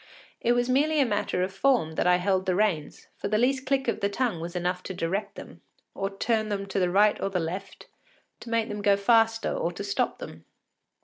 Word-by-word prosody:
It 240 Hz, -, +2 dB
was 245 Hz, 0 st, +1 dB
merely 290 Hz, +5 st, +2 dB
as -, -, +6 dB
a 250 Hz, -, -2 dB
matter 205 Hz, -3 st, 0 dB
of 190 Hz, +1 st, -3 dB
form 245 Hz, -7 st, +2 dB
that 165 Hz, -, 0 dB
I 180 Hz, -, +6 dB
held 190 Hz, +1 st, 0 dB
the 185 Hz, -, +2 dB
reins, 185 Hz, -7 st, -1 dB
for -, -, -3 dB
the 215 Hz, -, +1 dB
least 260 Hz, +3 st, +1 dB
click 270 Hz, -1 st, +1 dB
of 230 Hz, -, 0 dB
the 200 Hz, -1 st, 0 dB
tongue 225 Hz, -4 st, -1 dB
was 170 Hz, +2 st, -6 dB
enough 180 Hz, +1 st, -1 dB
to 190 Hz, -, -7 dB
direct 190 Hz, +4 st, -2 dB
them, -, -, -11 dB, 0.3 s
to 195 Hz, 0 st, -2 dB
turn 220 Hz, -1 st, 0 dB
them 200 Hz, -1 st, -2 dB
to 195 Hz, -, -1 dB
the 180 Hz, -1 st, +2 dB
right 205 Hz, +3 st, +3 dB
or 195 Hz, -, 0 dB
the 190 Hz, -2 st, -1 dB
left, 185 Hz, +4 st, -6 dB, 0.5 s
to -, -, -10 dB
make 230 Hz, -1 st, +1 dB
them 210 Hz, 0 st, -5 dB
go 200 Hz, -1 st, +4 dB
faster, 225 Hz, +2 st, +3 dB
or -, -, -1 dB
to -, -, -6 dB
stop -, -, -1 dB
them. -, -, -10 dB
205 Hz, 235 wpm, -27 LUFS, 185-230 Hz, 0.5 s, as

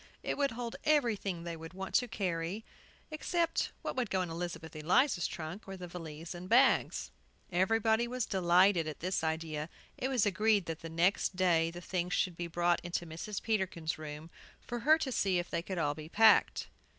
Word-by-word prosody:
It -, -, -1 dB
would 280 Hz, -1 st, +1 dB
hold 235 Hz, 0 st, -5 dB
everything 215 Hz, -, +1 dB
they 170 Hz, -1 st, -4 dB
would 165 Hz, +2 st, -10 dB
want 190 Hz, 0 st, -6 dB
to 245 Hz, -, +3 dB
carry, 185 Hz, -1 st, -3 dB, 0.5 s
except 335 Hz, +2 st, 0 dB
what -, -, -3 dB
would 245 Hz, -5 st, -1 dB
go 190 Hz, -1 st, +1 dB
in 170 Hz, -, -5 dB
Elizabeth 170 Hz, -1 st, -5 dB
Eliza's 175 Hz, -, +2 dB
trunk, 170 Hz, +6 st, -7 dB
or 195 Hz, 0 st, -6 dB
the 180 Hz, -1 st, -7 dB
valise 165 Hz, -1 st, -7 dB
and 180 Hz, +1 st, -8 dB
bags. 255 Hz, +3 st, +3 dB, 0.4 s
Everybody 220 Hz, +5 st, +2 dB
was 250 Hz, -1 st, -2 dB
delighted 180 Hz, -2 st, +4 dB
at 155 Hz, -, -6 dB
this 180 Hz, -1 st, -1 dB
idea. 160 Hz, -1 st, -2 dB, 0.3 s
It 260 Hz, -, 0 dB
was 255 Hz, -5 st, +2 dB
agreed 205 Hz, 0 st, +2 dB
that 165 Hz, -1 st, -4 dB
the 165 Hz, -, -7 dB
next 175 Hz, +4 st, +1 dB
day 170 Hz, -3 st, +3 dB
the 175 Hz, +1 st, -8 dB
things 180 Hz, 0 st, -2 dB
should 180 Hz, -2 st, 0 dB
be 175 Hz, 0 st, -4 dB
brought 175 Hz, +1 st, +1 dB
into 175 Hz, 0 st, -3 dB
Mrs. 170 Hz, +6 st, -6 dB
Peterkin's 185 Hz, -8 st, -1 dB
room, 155 Hz, +1 st, -8 dB, 0.3 s
for 240 Hz, -, -5 dB
her 305 Hz, +6 st, +5 dB
to 290 Hz, -5 st, -3 dB
see 195 Hz, -6 st, +1 dB
if 175 Hz, 0 st, -3 dB
they -, -, 0 dB
could 185 Hz, +2 st, -5 dB
all 145 Hz, -3 st, +1 dB
be 155 Hz, +1 st, -9 dB
packed. 220 Hz, +4 st, +5 dB
180 Hz, 190 wpm, -32 LUFS, 165-220 Hz, 0.5 s, her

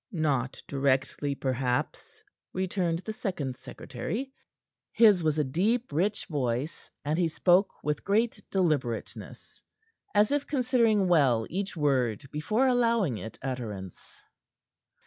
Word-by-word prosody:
"Not 140 Hz, -7 st, -1 dB
directly, 140 Hz, +1 st, 0 dB
perhaps," 130 Hz, -2 st, -2 dB, 0.3 s
returned 180 Hz, -2 st, -1 dB
the 220 Hz, -, -3 dB
second 150 Hz, -12 st, -3 dB
secretary. 225 Hz, -, -5 dB, 0.6 s
His 210 Hz, -6 st, +6 dB
was 155 Hz, -1 st, +1 dB
a 150 Hz, -, +3 dB
deep, 210 Hz, -, 0 dB
rich 195 Hz, +8 st, 0 dB
voice, 135 Hz, 0 st, -3 dB, 0.2 s
and 155 Hz, +4 st, 0 dB
he 175 Hz, -, +3 dB
spoke 180 Hz, +4 st, +3 dB
with 150 Hz, -1 st, -2 dB
great 220 Hz, +1 st, +1 dB
deliberateness, 150 Hz, -, -2 dB, 0.5 s
as 210 Hz, +3 st, +4 dB
if 290 Hz, 0 st, 0 dB
considering 235 Hz, -7 st, +2 dB
well 135 Hz, -10 st, +3 dB
each 195 Hz, +1 st, -3 dB
word 130 Hz, -6 st, +1 dB
before 215 Hz, -, +1 dB
allowing 230 Hz, -, +2 dB
it 110 Hz, -, -8 dB
utterance. 110 Hz, -9 st, -6 dB
160 Hz, 115 wpm, -28 LUFS, 135-205 Hz, 0.6 s, His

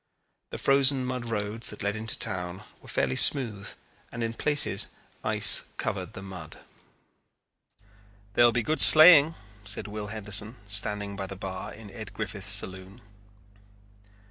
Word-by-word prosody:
The -, -, -8 dB
frozen 135 Hz, -1 st, +2 dB
mud 125 Hz, -1 st, -6 dB
roads 110 Hz, 0 st, -5 dB
that -, -, -9 dB
led 100 Hz, +1 st, -3 dB
into 110 Hz, 0 st, -3 dB
town 90 Hz, +1 st, -5 dB, 0.2 s
were -, -, -18 dB
fairly 65 Hz, -1 st, -2 dB
smooth 110 Hz, -, +4 dB, 0.4 s
and 115 Hz, -, -6 dB
in 115 Hz, 0 st, -4 dB
places 145 Hz, +4 st, 0 dB, 0.4 s
ice -, -, 0 dB
covered -, -, -6 dB
the 95 Hz, -, -11 dB
mud. 95 Hz, -2 st, -11 dB, 1.8 s
"There 120 Hz, -, +2 dB
will 120 Hz, -, +4 dB
be 120 Hz, 0 st, -2 dB
good 155 Hz, +7 st, -1 dB
sleighing," 155 Hz, -1 st, +8 dB, 0.3 s
said 105 Hz, 0 st, -3 dB
Will 105 Hz, 0 st, -8 dB
Henderson, 105 Hz, +1 st, -1 dB
standing 105 Hz, 0 st, 0 dB
by 95 Hz, -1 st, -7 dB
the 95 Hz, -, -9 dB
bar 95 Hz, 0 st, -8 dB
in 105 Hz, -2 st, -13 dB
Ed 110 Hz, -3 st, -11 dB
Griffith's 100 Hz, -2 st, -5 dB
saloon. 95 Hz, +2 st, -3 dB
105 Hz, 145 wpm, -25 LUFS, 100-120 Hz, 1.8 s, sleighing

